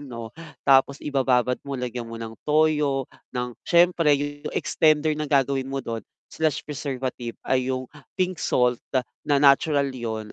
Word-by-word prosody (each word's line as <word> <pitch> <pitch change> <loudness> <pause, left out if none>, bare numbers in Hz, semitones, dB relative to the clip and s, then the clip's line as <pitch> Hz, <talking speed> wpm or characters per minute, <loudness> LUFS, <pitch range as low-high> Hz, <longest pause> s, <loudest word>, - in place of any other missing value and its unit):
'no. 115 -5 -8 0.3
Tapos 135 0 +5
ibababad 125 -3 +1
mo 140 - -3
lagyan 125 -2 -4
mo 115 - -7
ng 115 -1 -6 0.2
toyo 150 -3 +2 0.3
ng 125 0 -2
siyempre 170 -3 +4
yung 145 +1 -5
extender 155 0 +2
na 150 -1 -3
gagawin 135 -1 +1
mo 135 -1 -4
dun, 115 -1 -3 0.3
slash 155 -2 -1
preservative 130 -5 -4
ay 130 -1 +1
yung 130 0 -2 0.3
pink 185 -2 -1
salt 125 -1 +2 0.5
na 145 - +4
natural 140 0 +4
yun 110 -4 -5
135 Hz, 145 wpm, -24 LUFS, 125-150 Hz, 0.5 s, Tapos